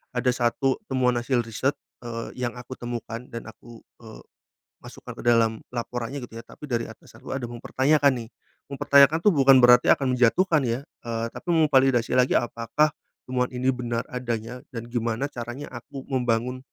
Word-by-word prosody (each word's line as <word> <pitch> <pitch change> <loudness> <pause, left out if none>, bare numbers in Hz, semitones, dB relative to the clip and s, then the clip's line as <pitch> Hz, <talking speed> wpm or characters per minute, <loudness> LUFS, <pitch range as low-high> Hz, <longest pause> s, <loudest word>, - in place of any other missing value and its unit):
ada 125 +1 +2
satu 125 +2 0
temuan 130 -2 +2
hasil 120 0 0
riset, 125 +5 -1 0.3
eee, 115 -1 -6
yang 120 - -6
aku 125 +1 -8
temukan 120 -1 -5
dan 115 - -7
aku, 115 +1 -14 0.2
eee, 110 -1 -12 0.6
masukkan - - -10
ke - - -9
dalam 115 -2 +3
laporannya 120 +2 -4
gitu 115 - -13
ya, 115 - -7
tapi 150 - -11
dari 115 -2 -1
atasanku 110 - -14
ada 135 -1 -3
mempertanyakan 135 +4 +2
nih. - - -14 0.4
Mempertanyakan 140 +2 +5
tuh 210 - +7
bukan 135 -3 +6
berarti 125 0 +7
akan 130 -2 +1
menjatuhkan 155 +6 +3
ya, 120 +2 -1 0.2
eee, 115 -1 -2
tapi - - -11
memvalidasi 135 -7 +3
lagi 125 0 +3
apakah 120 +6 +1 0.4
temuan 125 0 +1
ini 125 +1 -1
benar 120 -2 -3
adanya, 125 -1 -4
dan 115 - -5
gimana 120 +3 -1
caranya 120 +4 -6
aku 130 +3 -8
membangun 125 0 0
125 Hz, 160 wpm, -25 LUFS, 115-135 Hz, 0.6 s, tuh